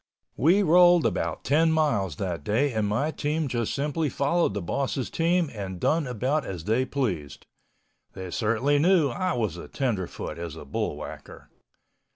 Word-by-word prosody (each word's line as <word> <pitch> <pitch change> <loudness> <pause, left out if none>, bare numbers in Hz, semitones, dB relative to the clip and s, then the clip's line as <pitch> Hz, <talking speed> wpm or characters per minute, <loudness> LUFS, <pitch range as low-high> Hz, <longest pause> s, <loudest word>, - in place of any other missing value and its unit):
We 180 +8 +4
rolled 175 0 +6
about - - -1
10 160 +3 +3
miles 115 - +1
that 85 -5 -4
day 125 - +1
and 110 -2 0
my 135 +10 0
team 155 0 -1
just 120 -3 -2
simply 150 +2 -1
followed 155 +6 +1
the - - -1
boss' 135 - -2
team 170 -1 +1
and 95 -4 -6
done 160 - +1
about 130 +5 -1
as 90 -4 -6
they 115 +7 +1
pleased. 95 - -3 0.7
They 95 -2 -7
certainly 120 +8 +1
knew 170 -2 +4
I 180 +9 -1
was 105 - -2
a - - -8
tenderfoot 105 - -3
as 85 -2 -6
a 80 - -10
bullwhacker. 70 - -6
135 Hz, 160 wpm, -26 LUFS, 100-155 Hz, 0.7 s, rolled